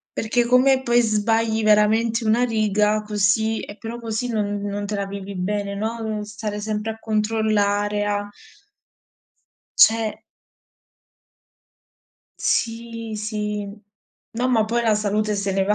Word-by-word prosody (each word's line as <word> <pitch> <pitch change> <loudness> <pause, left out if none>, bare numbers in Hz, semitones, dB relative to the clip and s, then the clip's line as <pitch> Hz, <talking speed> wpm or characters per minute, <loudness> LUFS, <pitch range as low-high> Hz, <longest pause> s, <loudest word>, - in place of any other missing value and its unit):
Perché 235 +2 +1
come 260 +2 +4
poi 240 -1 +3
sbagli 225 0 +1
veramente 220 +2 +3
una 225 +3 +3
riga 215 -2 +1
così 215 +1 +1
e 205 - -9
però 230 +1 -6
così 230 +2 -3
non 205 -3 -1
non 205 0 -3
te 210 0 -3
la 200 0 -2
vivi 200 0 -7
bene, 200 +2 -2
no, 225 +3 -3
n 220 -1 -2
lo 210 - -4
stare 210 0 -5
sempre 215 +1 -3
a 220 - -13
controllare, 210 -2 0
a 205 0 -1 1.5
Cioè 220 -1 +4 2.2
Sì, 230 -1 -2
sì. 210 -1 -3 0.6
No, 245 +3 -1
ma 225 -4 +3
poi 235 +2 0
la 220 -2 +3
salute 210 0 0
se 200 0 -1
ne 195 0 +1
va, 210 +2 +2
215 Hz, 135 wpm, -22 LUFS, 205-225 Hz, 2.2 s, come